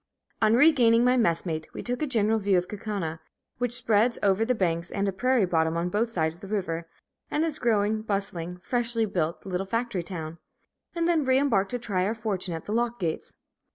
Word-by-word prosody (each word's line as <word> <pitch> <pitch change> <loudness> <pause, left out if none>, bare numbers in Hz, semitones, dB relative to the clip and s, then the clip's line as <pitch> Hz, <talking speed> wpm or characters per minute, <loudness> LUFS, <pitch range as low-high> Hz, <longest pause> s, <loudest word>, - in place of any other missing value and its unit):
On 220 0 +5
regaining 240 -5 +5
my 250 0 +4
messmate, 165 -8 0
we - - -5
took 245 +2 -3
a 305 - 0
general 225 -3 +2
view 200 -2 +2
of 180 0 0
Kaukauna, 195 -6 -4 0.4
which 245 -1 0
spreads 235 -1 +2
over 200 +2 +3
the 250 +2 +1
banks 170 -4 0
and 200 0 -1
a - - +1
prairie 250 +3 +2
bottom 165 -2 +1
on 170 +1 -1
both 225 +4 +1
sides 160 -7 0
of 170 - -14
the 195 - -8
river, 170 -5 -3 0.4
and 300 - 0
is 320 -3 -1
a - - -17
growing, 215 -2 +1
bustling, 195 -5 -3
freshly 235 -1 0
built 170 -5 -2
little 190 0 -3
factory 230 -3 -1
town, 165 -2 -7 0.6
and 335 0 +1
then 335 -3 +2
re 260 -1 +3
embarked 225 -9 +2
to 245 - -2
try 205 -6 -1
our 220 - -1
fortune 195 -6 -3
at 160 - -7
the 210 - -3
lock 240 +1 0
gates. 165 -4 -3
210 Hz, 210 wpm, -27 LUFS, 180-240 Hz, 0.6 s, On